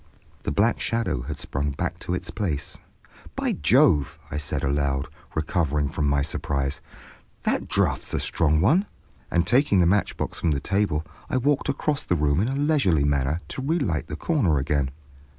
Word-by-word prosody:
The - - -2
black 110 +4 +2
shadow 115 - -1
had - - -5
sprung 70 +2 -2
back 70 - -3
to 90 - -2
its - - -5
place. 80 -9 -3 0.6
"By - - 0
Jove," 85 - +3 0.2
said 75 -1 -2
I - - +1
aloud, 70 0 0 0.3
recovering 75 -2 0
from 75 -1 -1
my 70 -1 +2
surprise, 70 -1 -2 0.6
"that - - 0
draft's - - +1
a - - 0
strong 75 -1 +2
one;" 165 - +3 0.4
and 85 -1 +2
taking 125 -1 +3
the 85 - +5
matchbox 100 +4 0
from 85 - +1
the 70 -3 +1
table, 90 -2 0 0.2
I - - +1
walked 140 +3 +1
across 145 +1 0
the 90 - 0
room 75 -1 +2
in 105 - +1
a 135 - -1
leisurely 140 - +2
manner 70 +3 +1
to - - -5
relight 135 - 0
the - - -5
corner 100 - +1
again. 70 0 0
80 Hz, 170 wpm, -25 LUFS, 70-115 Hz, 0.6 s, the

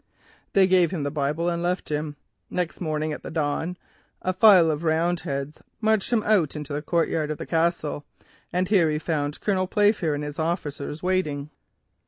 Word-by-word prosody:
"They 195 -1 +6
gave 185 -2 +4
him 160 -4 -3
the 145 - -2
Bible 150 +3 -1
and 170 -1 0
left 180 +1 -1
him. 150 0 -2 0.3
Next 180 0 -3
morning 155 -2 -1
at - - -7
the - - -7
dawn, 160 +3 -2 0.5
a 185 - 0
file 185 -4 +7
of 150 0 -3
Roundheads 160 -3 -1 0.2
marched 220 -1 +1
him 225 -3 +2
into 155 -8 +1
the 145 - -2
courtyard 160 -1 0
of 155 - -3
the - - -6
Castle 165 -3 0 0.5
and 180 +1 0
here 180 -6 +4
he 150 - 0
found 150 -2 -2
Colonel 185 -3 +1
Playfair 205 -6 +2
and 145 - -4
his 150 +1 -6
officers 160 -2 -3
waiting. 155 -6 -1
165 Hz, 175 wpm, -25 LUFS, 150-180 Hz, 0.5 s, file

